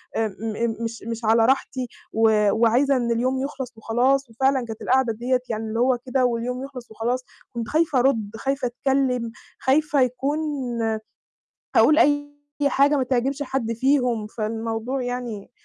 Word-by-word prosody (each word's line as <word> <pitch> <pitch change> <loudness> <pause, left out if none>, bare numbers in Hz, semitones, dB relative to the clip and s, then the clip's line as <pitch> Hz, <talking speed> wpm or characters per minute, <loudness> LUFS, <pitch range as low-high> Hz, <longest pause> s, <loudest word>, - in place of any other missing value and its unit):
آآ، 225 -1 +1
م 225 +1 -2
مش 230 -1 -5
مش 230 0 -4
على 225 +1 +5
راحتي، 260 0 0 0.3
وآآ، 215 -2 +4
وعايزة 235 +6 +3
إن 240 -1 0
اليوم 255 +3 0
يخلص 265 -4 -5
وخلاص، 255 +4 +1
وفعلًا 265 +2 +1
كانت 225 -1 -8
القعدة 260 -2 +2
ديَّة 245 +3 0
يعني 220 0 -2
اللي 220 +1 -3
هو 250 +1 +3
كده 255 0 +1
واليوم 245 +1 -2
يخلص 255 -4 -9
وخلاص، 240 +4 -2 0.3
كنت 235 -1 -4
خايفة 310 -4 +2
أرُدّ، 225 -6 +1
خايفة 270 +1 -1
أتكلّم، 250 -2 0 0.3
خايفة 295 +1 +2
يكون 265 +4 0 0.4
آآ، 220 -1 0 0.8
هاقول 310 - +6
أي 290 -2 +3 0.4
حاجة 280 +2 +4
ما 265 - +1
تعجبش 265 +3 0
حد 260 -4 -2
فيهم، 250 -2 +1
فالموضوع 225 +4 -3
يعني 245 -4 -5
245 Hz, 155 wpm, -23 LUFS, 225-270 Hz, 0.8 s, هاقول